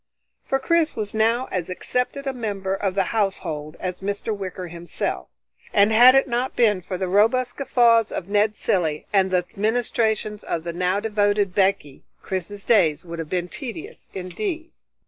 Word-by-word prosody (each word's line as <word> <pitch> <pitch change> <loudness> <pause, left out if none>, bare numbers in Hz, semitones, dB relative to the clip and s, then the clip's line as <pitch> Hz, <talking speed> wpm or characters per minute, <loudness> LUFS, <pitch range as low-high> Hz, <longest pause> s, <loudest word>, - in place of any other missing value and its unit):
For 270 - 0
Chris 325 +3 +1
was 210 -2 -4
now 225 +3 +2
as 180 -2 -2
accepted 250 +8 -2
a 270 - -1
member 200 -6 -3
of 195 -1 -2
the 195 - +3
household 165 -8 -2
as 180 -1 -4
Mr. 205 +2 -3
Wicker 185 -2 -6
himself, 170 0 -4 0.5
and 205 +1 +5
had 245 +4 +8
it 270 - +4
not 245 +1 -1
been 210 -6 +3
for 185 +1 -5
the 190 0 -2
robust 225 +6 +2
guffaws 235 -5 +3
of 175 - -4
Ned 210 +1 +2
Cilley, 160 -8 0
and 190 -1 +4
the 180 -1 +1
ministrations 220 -1 0
of 165 - -3
the 170 0 -4
now 180 +3 0
devoted 205 -2 +1
Becky, 190 -8 0 0.2
Chris's 195 +2 -4
days 170 -7 +3
would 170 -1 -7
have 160 -2 -5
been 180 +1 -1
tedious 310 - -8
indeed. 320 - -4
205 Hz, 165 wpm, -23 LUFS, 185-235 Hz, 0.5 s, had